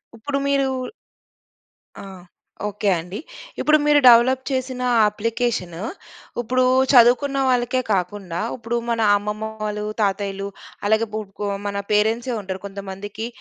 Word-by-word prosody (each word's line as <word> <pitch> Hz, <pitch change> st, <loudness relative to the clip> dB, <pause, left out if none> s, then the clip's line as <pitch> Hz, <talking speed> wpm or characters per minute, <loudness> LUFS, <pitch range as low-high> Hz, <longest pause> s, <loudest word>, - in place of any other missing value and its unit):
ఇప్పుడు 275 Hz, +5 st, -3 dB
మీరూ 275 Hz, -1 st, +2 dB, 1.4 s
ఆహ్, 190 Hz, -2 st, -11 dB, 0.4 s
ఓకే. 210 Hz, 0 st, -1 dB
అండి. 180 Hz, +5 st, -7 dB, 0.4 s
ఇప్పుడు 305 Hz, 0 st, +4 dB
మీరు 295 Hz, 0 st, +5 dB
డెవలప్ 250 Hz, +2 st, +6 dB
చేసిన 260 Hz, -1 st, -2 dB, 0.3 s
అప్లికేషను 220 Hz, -5 st, -2 dB, 0.6 s
ఇప్పుడు 255 Hz, +2 st, +1 dB, 0.3 s
చదువుకున్న 255 Hz, +3 st, +5 dB
వాళ్ళకే 250 Hz, 0 st, +1 dB
కాకుండా, 180 Hz, -2 st, -2 dB, 0.2 s
ఇప్పుడు 235 Hz, -1 st, -3 dB
మన 230 Hz, -1 st, 0 dB, 0.2 s
అమ్మమ్మవాలు, 210 Hz, 0 st, -4 dB, 0.2 s
తాతయ్యలు 195 Hz, -1 st, -1 dB, 0.4 s
అలాగే 220 Hz, +2 st, +2 dB
గు 215 Hz, -, -1 dB, 0.2 s
గొ 205 Hz, -, -1 dB, 0.2 s
మన 200 Hz, 0 st, -3 dB
పేరెంట్సే 225 Hz, +4 st, +1 dB
ఉంటారు. 190 Hz, -1 st, -6 dB
కొంతమందికి 200 Hz, +2 st, -6 dB
220 Hz, 110 wpm, -22 LUFS, 200-245 Hz, 1.4 s, డెవలప్